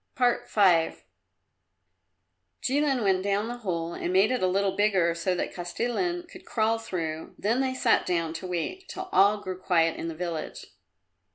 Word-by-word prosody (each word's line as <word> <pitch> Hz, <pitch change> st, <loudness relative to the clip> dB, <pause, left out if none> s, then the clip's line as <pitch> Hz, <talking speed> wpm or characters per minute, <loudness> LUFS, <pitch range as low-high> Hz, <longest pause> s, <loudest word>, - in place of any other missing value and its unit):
V 255 Hz, -, 0 dB, 2.4 s
Jilin 275 Hz, -2 st, +1 dB
went 190 Hz, -2 st, +2 dB
down 200 Hz, +2 st, 0 dB
the 240 Hz, +1 st, -5 dB
hole 170 Hz, -6 st, -3 dB
and 175 Hz, -, -3 dB
made 195 Hz, +5 st, +4 dB
it 255 Hz, -, 0 dB
a 185 Hz, -, +3 dB
little 195 Hz, +1 st, +1 dB
bigger 190 Hz, -5 st, +3 dB
so 180 Hz, +2 st, -1 dB
that -, -, -3 dB
Kostilin 245 Hz, -, -2 dB
could 365 Hz, +1 st, -13 dB
crawl 225 Hz, -4 st, 0 dB
through, 165 Hz, -7 st, -5 dB
then 230 Hz, +6 st, +1 dB
they 260 Hz, -1 st, -1 dB
sat 250 Hz, -3 st, +3 dB
down 165 Hz, -3 st, 0 dB
to 170 Hz, +3 st, -6 dB
wait 270 Hz, -, -4 dB
till 375 Hz, 0 st, -6 dB
all 205 Hz, +2 st, +4 dB
grew 185 Hz, -1 st, -5 dB
quiet 165 Hz, -3 st, +2 dB
in -, -, -4 dB
the 165 Hz, -, -5 dB
village. 170 Hz, -2 st, -5 dB
195 Hz, 165 wpm, -27 LUFS, 175-240 Hz, 2.4 s, made